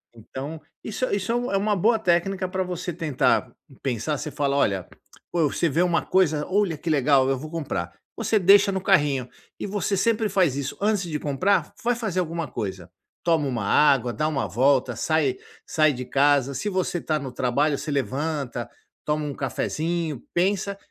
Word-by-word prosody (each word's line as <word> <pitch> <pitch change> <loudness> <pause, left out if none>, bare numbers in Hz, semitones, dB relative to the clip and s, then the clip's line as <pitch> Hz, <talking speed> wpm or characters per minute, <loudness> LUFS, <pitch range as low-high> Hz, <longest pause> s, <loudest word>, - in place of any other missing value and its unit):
Então, 135 +7 -7 0.2
isso 225 +4 -2
isso 200 +2 -1
é - - +1
um 245 +1 -1
é 195 - +2
uma 205 +1 +1
boa 220 +4 +3
técnica 185 0 +1
para 185 +1 -1
você 180 -1 -4
tentar 155 -6 +1 0.3
pensar, 135 +3 -1
você 150 - -5
fala: 140 -1 0
"olha", 95 -10 +1 0.5
você 170 0 +1
vê 160 +4 +1
uma 175 -1 +2
coisa, 160 -6 +2
"olha 190 -4 +1
que 165 - -5
legal, 140 -3 +3
eu 135 - +1
vou 155 +4 -8
comprar". 130 - -3 0.2
Você 215 - +1
deixa 200 +2 +6
no 190 -1 -2
carrinho, 145 -10 +2 0.3
e - - -4
você 200 0 -1
sempre 220 +2 +2
faz 185 -8 +2
isso, 140 -1 -4
antes 205 -1 +2
de 150 -2 -2
comprar, 150 +8 0
vai 240 +1 +2
fazer 215 -6 -2
alguma 165 -2 -2
coisa. 95 -7 -5 0.3
Toma 165 -4 +2
uma 120 -5 -2
água, 135 0 +4
dá 155 +4 0
uma 140 -4 -1
volta, 130 0 +2
sai 155 -2 +1 0.3
sai 155 -1 +3
de 125 0 -6
casa, 140 0 +2
se 140 +10 -2
você 185 -2 -1
está 155 -2 -1
no 135 -3 -6
trabalho 140 +4 +1
você 150 - -5
levanta, 140 -1 -2 0.4
toma 150 0 0
um 145 - -3
cafezinho, 155 +1 -2
pensa, 195 +2 0
155 Hz, 180 wpm, -24 LUFS, 135-185 Hz, 0.5 s, deixa